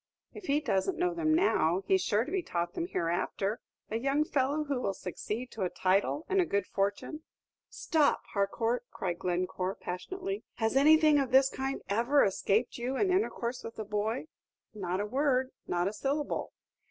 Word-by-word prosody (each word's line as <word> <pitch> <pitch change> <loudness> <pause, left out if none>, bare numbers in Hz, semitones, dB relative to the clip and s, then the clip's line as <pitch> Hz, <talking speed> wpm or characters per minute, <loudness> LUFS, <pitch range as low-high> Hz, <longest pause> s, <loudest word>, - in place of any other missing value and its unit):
"If 400 - -10
he 285 +2 +3
doesn't 255 - 0
know 360 0 +1
them 330 -2 0
now, 195 - +3
he's 190 -1 +3
sure 210 +4 +1
to 300 - -7
be 380 0 0
taught 175 - -3
them 340 - -2
hereafter. 185 - -1 0.3
A 220 - 0
young 275 +4 +2
fellow 285 +1 +1
who 280 -4 -2
will 195 -4 -1
succeed 215 +8 -5
to 220 - -7
a 185 - +1
title 190 - +1
and 385 0 +3
a - - +4
good 200 -1 0
fortune 200 - -2 0.3
" - - -63
"Stop, 310 -4 +3
Harcourt!" 225 +4 0
cried 175 -2 -3
Glencore, 185 +1 -1
passionately. 380 - -5
"Has 225 +1 0
anything 305 +1 +6
of 270 -3 0
this 265 +1 +5
kind 270 +1 -3
ever 240 +8 +3
escaped 205 +5 +1
you 250 +3 -2
in 390 -2 +2
intercourse 255 - -1
with 230 - -7
the 220 - -5
boy?" 210 +5 -1 0.5
"Not 185 -3 -2
a 205 - 0
word 260 +2 +1 0.2
not 175 +1 0
a 200 - -2
syllable." 280 +6 -2
240 Hz, 180 wpm, -30 LUFS, 195-295 Hz, 0.5 s, anything